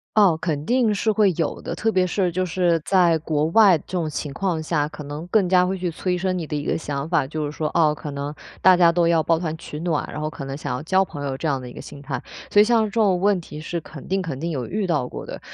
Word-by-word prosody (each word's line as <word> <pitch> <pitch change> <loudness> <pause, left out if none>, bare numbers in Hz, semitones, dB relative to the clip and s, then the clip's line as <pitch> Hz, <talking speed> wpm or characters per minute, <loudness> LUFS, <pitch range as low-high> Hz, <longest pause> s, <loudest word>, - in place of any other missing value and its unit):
哦， 200 -6 +5
肯 150 -3 -2
定 240 -1 +2
是 215 +2 +1
会 210 -2 +3
有 165 - -2
的， - - -5
特 225 - 0
别 185 -3 +2
是 180 0 0
就 185 +2 -1
是 175 -2 +1
在 180 -4 +4
国 155 -1 0
外 190 +1 +6
这 - - -15
种 160 -3 -1
情 145 -1 -5
况 175 -2 -1
下， 155 -2 0
可 150 - -9
能 145 +3 -6
更 195 -1 +2
加 180 0 +4
会 190 +1 -2
去 180 -1 -2
催 180 +2 -2
生 185 +1 -1
你 165 -4 -4
的 - - -3
一 145 0 -3
个 - - 0
想 145 -1 -4
法， 165 -6 +1
就 155 +1 -3
是 145 - -4
说， 155 0 -2
哦， 155 -3 +4
可 150 0 -7
能 140 +1 -4 0.3
大 185 -1 +7
家 175 -1 +5
都 170 0 +2
要 165 -1 +3
抱 165 +1 +2
团 160 -2 -3
取 150 - -8
暖， 165 -2 -1
然 - - -5
后 155 - -2
可 155 -2 -8
能 135 +1 -5
想 125 - -3
要 125 - -4
交 190 +4 +2
朋 145 -5 -7
友 135 -1 -3
这 160 - -3
样 135 -3 0
的 125 - -8
一 - - -11
个 - - -10
心 140 - -10
态。 140 - -4 0.3
所 205 - +5
以 210 - +8
像 230 -1 +3
这 - - -4
种 205 -5 +2
问 200 -1 +3
题 155 -2 -9
是 170 +2 -3
肯 150 -2 -11
定 195 +1 0
肯 160 -7 -4
定 170 +3 -3
有 130 -6 -3
遇 200 - -2
到 150 -7 0
过 - - -7
的， - - -7
165 Hz, 315 characters per minute, -23 LUFS, 150-185 Hz, 0.3 s, 以